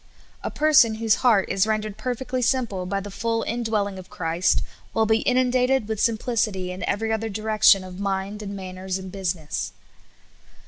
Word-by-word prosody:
A - - -2
person 290 -7 +4
whose 220 -1 +2
heart 220 -7 +4
is 195 +2 +1
rendered 215 -1 -1
perfectly 255 +1 -3
simple 225 -8 0
by 195 +1 -1
the 205 +1 -8
full 225 +3 -1
indwelling 215 -4 -1
of 185 - -12
Christ 165 +1 0 0.3
will 225 - +3
be 220 +1 +2
inun 255 0 +3
dated 255 -2 +2
with 220 -2 -3
simplicity 220 -5 0
in 180 - -7
every 220 +2 0
other 220 0 -2
direction 215 -2 +4
of 185 0 -9
mind 200 +1 -2
and 200 -1 -6
manners 185 0 -5
and 190 -1 -8
business. 180 -5 -3
215 Hz, 170 wpm, -24 LUFS, 190-230 Hz, 0.3 s, person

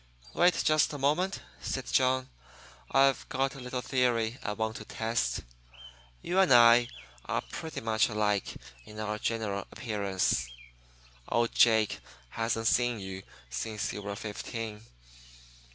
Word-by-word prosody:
"Wait 175 -1 +3
just 155 -1 +4
a - - -4
moment," 155 +8 0 0.2
said 130 -2 -3
John. 130 0 +2 0.6
"I've 135 0 +3
got 135 +1 0
a 135 - -10
little 125 0 -4
theory 120 -2 +1
I 105 - -3
want 110 0 -2
to - - -8
test. 110 - -1 0.8
You 180 +2 +1
and 190 -5 +4
I 120 0 +7 0.4
are - - -1
pretty 160 -1 -5
much 110 0 +2
alike 105 -2 0 0.3
in 105 - -11
our 105 0 -3
general 105 -4 -2
appearance. 100 - -1 0.8
Old 120 0 +1
Jake 110 -2 +4 0.3
hasn't 115 - -2
seen 120 0 +2
you 95 -1 -6 0.3
since 105 - -3
you 105 - -5
were 100 0 -5
fifteen. 105 +1 -6
115 Hz, 135 wpm, -30 LUFS, 105-130 Hz, 0.8 s, I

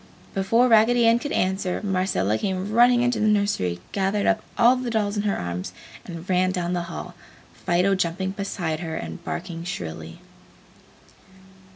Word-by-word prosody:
Before 230 +6 +3
Raggedy 235 +1 +5
Ann 230 +1 +5
could 290 - -5
answer, 190 0 0
Marcella 185 - 0
came 190 +1 -2
running 240 +2 +5
into 245 0 +1
the 215 - +2
nursery, 200 - +1
gathered 200 +1 0
up 225 -1 +2 0.2
all 240 +2 +6
the 250 -1 -3
dolls 210 -2 0
in 205 - 0
her - - 0
arms, 90 +1 -4 0.3
and 170 0 -8
ran 185 0 +2
down 180 -1 -2
the 175 - 0
hall, 175 +1 -7 0.4
Fido 180 +2 +1
jumping 190 +1 -1
beside 185 -5 -3
her 160 -2 -4
and 80 -1 -6
barking 170 -1 -5
shrilly. 80 - -6
190 Hz, 160 wpm, -24 LUFS, 170-215 Hz, 0.4 s, all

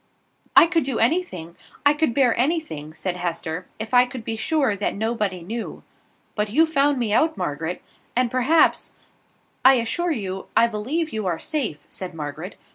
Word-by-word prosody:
"I - - +10
could 330 -2 +1
do 260 -3 -2
anything, 225 - 0 0.3
I 285 - +6
could 295 -5 0
bear 255 -4 +4
anything," 250 - -1
said 180 +3 -4
Hester, 175 0 -3
"if 220 +2 -6
I 250 0 +6
could 245 -3 -8
be 225 - -2
sure 270 -1 +1
that 200 - -2
nobody 210 -4 -2
knew. 225 +6 -6 0.5
But 210 -1 -1
you 310 +10 +4
found 290 -3 +2
me 230 -4 0
out, 315 +7 +2
Margaret, 160 +4 -3 0.3
and 245 -1 +2
perhaps 255 +6 +3 0.4
" - - -39 0.3
"I 265 +1 +8
assure 260 +9 0
you, 195 -8 -4
I - - +7
believe 260 +9 -2
you 215 -3 -2
are 170 -2 0
safe," 245 - -3
said 180 -2 -7
Margaret. 155 +4 -6
230 Hz, 175 wpm, -23 LUFS, 185-285 Hz, 0.5 s, I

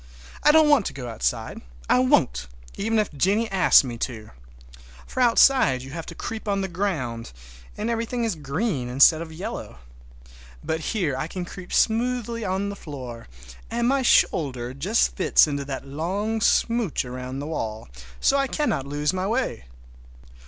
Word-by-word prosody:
I 300 - +6
don't 315 0 +6
want 290 -9 +4
to - - -5
go 125 -3 -7
outside. 115 0 -3 0.3
I 125 - +4
won't, 65 - +2 0.3
even 225 +2 -1
if 210 -6 0
Jennie 200 +10 +1
asks 185 -5 +6
me 120 -3 -6
to. 110 -4 -5 0.7
For 255 - -3
outside 235 - +4
you 135 - -10
have 165 +1 -6
to - - -8
creep 225 -2 -6
on 200 -1 0
the 190 - -2
ground, 160 - -3 0.5
and 210 - -3
everything 235 +1 -2
is 225 -3 0
green 150 - -2
instead 140 +5 +5
of 165 -1 -7
yellow. 160 - -6 0.9
But 160 - -2
here 165 - -1
I 135 +4 -3
can 180 +1 -5
creep 180 +1 -10
smoothly 235 0 +1
on 190 +1 -1
the 200 - -5
floor, 130 -9 -8 0.4
and 235 +1 0
my 275 +1 +2
shoulder 130 - +2
just 185 - +1
fits 190 - +5
in 145 -2 -3
that 140 -1 -5
long 195 +10 -2
smooch 230 - +1
around 125 +1 -6
the 140 - -5
wall, 110 -9 -4 0.3
so 280 - +3
I 275 0 +1
cannot 265 - -1
lose 145 +3 -1
my 185 +1 -2
way. 230 - -2
175 Hz, 165 wpm, -24 LUFS, 135-225 Hz, 0.9 s, I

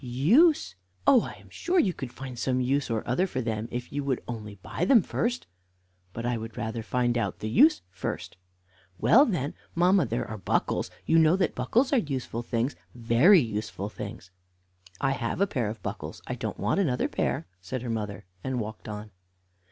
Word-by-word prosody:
"Use! 165 - +4 0.3
Oh, 255 - +7
I - - -6
am - - -17
sure 360 +2 -1
you 195 - +3
could 130 -6 -6
find 130 -2 -8
some 130 0 +1
use 135 +2 0
or 115 -2 -2
other 155 +11 +2
for 135 - -3
them 110 -2 -2
if 120 0 -5
you 145 0 -1
would 135 -3 0
only 105 -4 -6
buy 100 - -5
them 220 +1 +6
first." 240 +2 -1 0.7
"But 115 +4 -5
I 120 -1 0
would 115 0 -8
rather 115 0 -3
find 120 +1 0
out - - -2
the 110 - -5
use 155 - +5
first." 90 - -5 0.6
"Well, 270 +6 +6
then, 155 - -1 0.2
mamma, 180 -1 +4
there 115 - -2
are 110 - -6
buckles; - - 0 0.2
you 165 - +4
know 160 +2 +5
that 190 - +1
buckles 240 - +1
are 270 - +5
useful 130 - -3
things, 120 +3 -1 0.2
very 120 - +6
useful 105 -3 -4
things." 100 -3 -8 0.7
"I 135 -1 +1
have 120 0 -2
a 200 - +4
pair 125 - -1
of 110 +1 -8
buckles; - - -6
I - - -3
don't - - -4
want 105 - +1
another 135 -10 +1
pair," 80 - -1 0.2
said 125 +7 -5
her 120 - -4
mother, 105 -3 -4 0.2
and 130 -1 -2
walked 110 0 -6
on. 105 0 -7
125 Hz, 190 wpm, -27 LUFS, 110-160 Hz, 0.7 s, Oh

